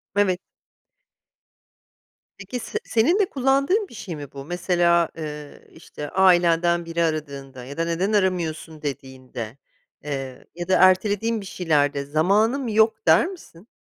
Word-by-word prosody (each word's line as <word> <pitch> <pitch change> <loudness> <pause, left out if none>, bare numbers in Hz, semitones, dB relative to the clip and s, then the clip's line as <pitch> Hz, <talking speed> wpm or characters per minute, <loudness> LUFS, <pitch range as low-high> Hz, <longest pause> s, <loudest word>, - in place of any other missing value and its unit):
Evet. 190 -3 +2 2.0
Peki 200 +6 -6
se - - -4
senin 265 - +2
de 405 - +4
kullandığın 275 - +1
bir - - -15
şey 200 -6 -7
mi 145 -2 -9
bu? 140 0 -9
Mesela, 175 -1 +2
eee, 150 -2 -8
işte, 150 -2 -9
ailenden 175 -2 +3
biri 170 0 -1
aradığında 140 -5 -4
ya 140 +2 -9
da 165 - 0
neden 180 +5 -1
aramıyorsun 170 -5 -1
dediğinde, 130 -4 -7 0.5
eee, 135 -3 -6
ya 175 0 -5
da 190 - +3
ertelediğin 205 +4 +3
bir 195 - -10
şeylerde 145 -6 0
"zamanım 210 - +1
yok" 220 -2 +2
der 160 +1 +6
misin? 235 - -12
175 Hz, 135 wpm, -23 LUFS, 150-205 Hz, 2.0 s, der